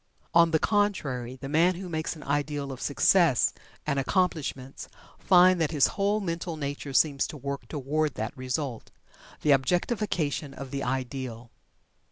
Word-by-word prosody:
On 170 0 +6
the 160 - +3
contrary, 150 - 0
the 135 +1 -8
man 165 +5 +3
who 185 +1 -7
makes 160 -1 -3
an 155 - -11
ideal 145 0 -2
of 130 - -8
success 155 - +3 0.3
and 140 -2 0
accomplishment 140 -4 -1 0.3
finds 185 -1 +5
that 160 -3 +1
his 150 -4 +3
whole 205 +1 +1
mental 170 -3 -4
nature 145 -1 -4
seems 140 0 +2
to 150 - -8
work 140 0 -5
toward 150 +1 -1
that 110 +1 -4
result 130 -1 -4 0.5
the 150 - +3
objectification 155 - 0
of 135 -2 -8
the 140 - -3
ideal. 125 -2 -4
145 Hz, 150 wpm, -27 LUFS, 135-170 Hz, 0.5 s, On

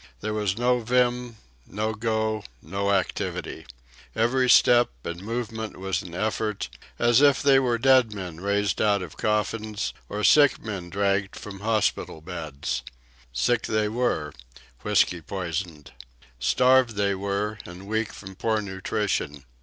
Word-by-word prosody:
There 110 0 -2
was 105 -2 -1
no 125 +1 +2
vim, 125 0 +1 0.3
no 110 +2 -2
go, 110 -1 -1 0.2
no 100 +7 -3
activity. 95 -8 -2 0.5
Every 125 +3 +2
step 120 0 +6
and 85 +1 -5
movement 110 0 -4
was 95 -2 -2
an 85 -2 -9
effort, 105 +1 -2 0.3
as 120 +2 +4
if 140 -2 +5
they 135 -1 +6
were 125 -3 +1
dead 130 -2 +4
men 90 -5 -7
raised 100 0 0
out 100 -3 +2
of 85 - -9
coffins 105 0 -1 0.2
or 105 +1 -3
sick 145 +1 +6
men 95 -5 -6
dragged 100 +1 0
from 100 -2 -8
hospital 110 -6 0
beds. 80 -4 -4 0.5
Sick 115 - +1
they 110 -1 +1
were—whiskey 85 - -1
poisoned. 85 -3 -5 0.5
Starved 125 - +4
they 100 -1 +1
were, 100 +2 -2
and 90 +2 -10
weak 110 +1 -1
from 95 -1 -10
poor 110 +3 0
nutrition. 95 -7 -3
105 Hz, 135 wpm, -25 LUFS, 95-115 Hz, 0.5 s, step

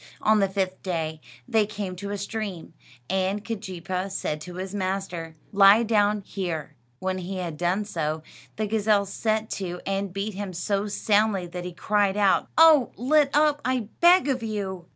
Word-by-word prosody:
On 215 0 +4
the 195 -1 +2
fifth 190 -1 -2
day 160 -4 -3 0.3
they 220 -2 +2
came 200 -3 -5
to 200 +2 -6
a 205 - -3
stream, 200 -5 -5 0.3
and 190 +2 -1
Keejeepaa 190 -3 -4
said 155 -5 -3
to 180 +2 -8
his 190 +1 -5
master, 185 -4 -3 0.2
"Lie 200 +3 +7
down 210 -2 +2
here." 175 -6 -4 0.2
When 185 +4 -2
he 185 +1 -5
had 175 -4 -4
done 180 +5 0
so, 155 -5 -3 0.3
the 215 - -1
gazelle 210 -1 +2
set 215 +2 -1
to 180 -1 -4
and 195 0 -2
beat 200 +3 -3
him 195 -1 -5
so 200 +4 -1
soundly 205 -2 +1
that 175 +1 -7
he 180 - -5
cried 205 +2 +1
out: 200 -2 +3
"Oh, 315 -6 +7
let 290 +3 +3
up, 295 -1 +3
I 250 -4 -1
beg 350 -1 +6
of 260 -3 0
you!" 195 -5 -4
195 Hz, 175 wpm, -25 LUFS, 185-215 Hz, 0.3 s, Lie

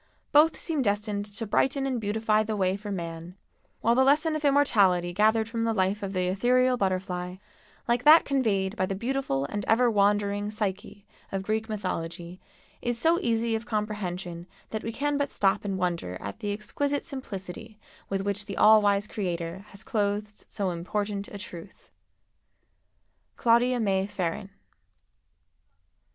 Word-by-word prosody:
Both 310 +2 +5
seem 315 -4 -1
destined 205 -2 -1
to 210 +2 -6
brighten 270 +6 +1
and 255 -4 -1
beautify 215 +1 +1
the 215 0 -2
way 190 -2 +1
for 205 +1 -7
man, 170 -1 -6 0.5
while 230 - +3
the 260 +2 +4
lesson 300 +4 +3
of 305 - -3
immortality 200 -12 +3
gathered 220 +3 +3
from 230 0 -2
the 225 -1 0
life 190 +1 +1
of 200 -1 -4
the 185 -1 0
ethereal 250 +7 +3
butterfly, 185 -3 -2 0.5
like 240 +1 +1
that 310 +2 +8
conveyed 215 -8 0
by 185 -4 0
the 195 - -2
beautiful 235 - -1
and 205 +6 -4
ever 235 +2 +3
wandering 205 0 +1
Psyche 205 -1 -4 0.3
of 195 -1 -2
Greek 220 +2 -2
mythology, 175 -3 -4 0.4
is 240 -1 -1
so 330 +7 +3
easy 230 0 0
of 225 +1 -3
comprehension 185 -5 -3 0.2
that 220 - -3
we 225 - -4
can 290 +4 -1
but 285 -1 0
stop 195 +1 +1
and 195 -2 -2
wonder 170 - -2
at 100 0 -7
the 205 - -2
exquisite 280 +7 -2
simplicity 220 - -8 0.3
with 195 -1 -1
which 205 +1 -3
the 200 - -6
all 215 0 +7
wise 205 0 +2
Creator 180 -2 -4
has 195 -1 -12
clothed 210 0 -2
so 195 -3 -2
important 200 +4 -3
a 205 - -8
truth. 185 -2 -11 1.5
Claudia 240 +2 +3
May 195 -3 +1
Ferrin. 190 0 -3
205 Hz, 155 wpm, -27 LUFS, 190-230 Hz, 1.5 s, that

